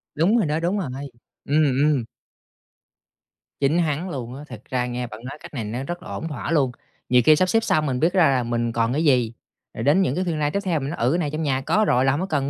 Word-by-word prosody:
Đúng 180 +10 +3
rồi 210 - +2
đó, 150 +2 0
đúng 175 +5 0
rồi, 170 -9 -3 0.6
ừm, 150 +2 +3 0.2
ừm. 145 -4 +2 1.6
Chính 145 +4 +2
hắn 165 +2 -1
luôn 125 -4 -5
á, 145 - -9
thực - - -10
ra 125 -1 -1
nghe 125 0 -3
bạn 110 -1 -10
nói 135 +3 -7
cách - - -11
này 125 -6 -3
nó 115 +5 -4
rất 175 +4 -6
là - - -10
ổn 165 - -4
thỏa 145 0 -5
luôn. 140 -6 +2 0.4
Nhiều 125 0 +5
khi 155 - +7
sắp 185 +3 +1
xếp 225 0 +2
xong 155 -7 +1
mình 130 -3 -1
biết 170 +3 +2
ra 180 -6 +5
là 130 -2 +1
mình 120 0 -1
còn 115 +1 0
cái 155 +4 0
gì, 125 -6 +3 0.4
rồi 110 - -5
đến 150 +8 +4
những 155 -8 +1
cái 185 - 0
phiên 170 -2 -1
live 150 -1 0
tiếp 200 - -1
theo 175 -5 0
mình 135 0 -4
nói: 170 - -5
"Ừ, 120 +3 +2
cái 170 - +2
này 155 -4 -1
trong 155 +1 -3
nhà 135 -3 0
có 215 +9 +2
rồi 125 +2 +3
là 135 - +4
hổng 145 +6 -1
có - - -1
cần 140 -5 -1
145 Hz, 280 wpm, -23 LUFS, 125-165 Hz, 1.6 s, khi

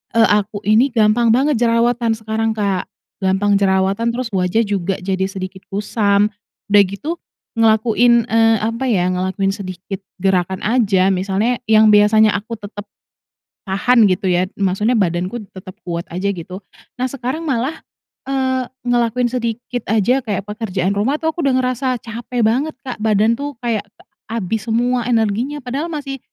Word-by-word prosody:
eee, 225 -1 +5
aku 205 +1 -6
ini 220 +6 +4
gampang 230 -1 +2
banget 270 -1 +2
jerawatan 235 -1 +2
sekarang, 220 0 -2
Kak, 200 -3 -1 0.3
gampang 195 +1 +2
jerawatan, 195 +3 +1
terus 245 -2 -4
wajah 185 +4 +1
juga 195 -2 -1
jadi 190 0 -1
sedikit 190 0 -7
kusam. 205 0 +1 0.4
Udah 205 -1 +7
gitu 295 - -5 0.4
ngelakuin, 225 +1 +4
eee, 225 0 +4
apa 230 +4 -2
ya, 185 -6 +2
ngelakuin 190 +2 -1
sedikit 190 -1 -6 0.2
gerakan 190 -1 0
aja, 200 -5 +2
misalnya 195 +6 0
yang 215 0 +6
biasanya 210 +1 +5
aku 225 +3 -8
tetep 205 0 -9 0.8
tahan 215 +4 +3
gitu 185 0 0
ya, 180 +1 +2
maksudnya 200 +4 0
badanku 185 +3 -1
tetep 185 -1 -11
kuat 170 -1 -4
aja 195 +3 -1
gitu. 185 +1 -7 0.4
Nah, 255 - +1
sekarang 275 +4 -4
malah, 265 +4 -1 0.5
eee, 260 -2 0 0.2
ngelakuin 240 0 +1
sedikit 245 0 -3
aja 225 +5 +2
kayak 205 -3 -2
pekerjaan 200 -4 -2
rumah 270 +10 0
tuh 320 - +2
aku 325 -1 -4
udah 265 - +2
ngerasa 255 0 -1
capek 235 +1 -4
banget, 260 +8 +1
Kak, 255 -5 -6
badan 220 +2 +2
tuh 285 0 -4
kayak 220 -4 -1 0.4
habis 220 0 -3
semua 240 +1 0
energinya, 235 +5 0
padahal 270 +6 -3
masih, 275 -2 -5
220 Hz, 150 wpm, -18 LUFS, 195-240 Hz, 0.8 s, Udah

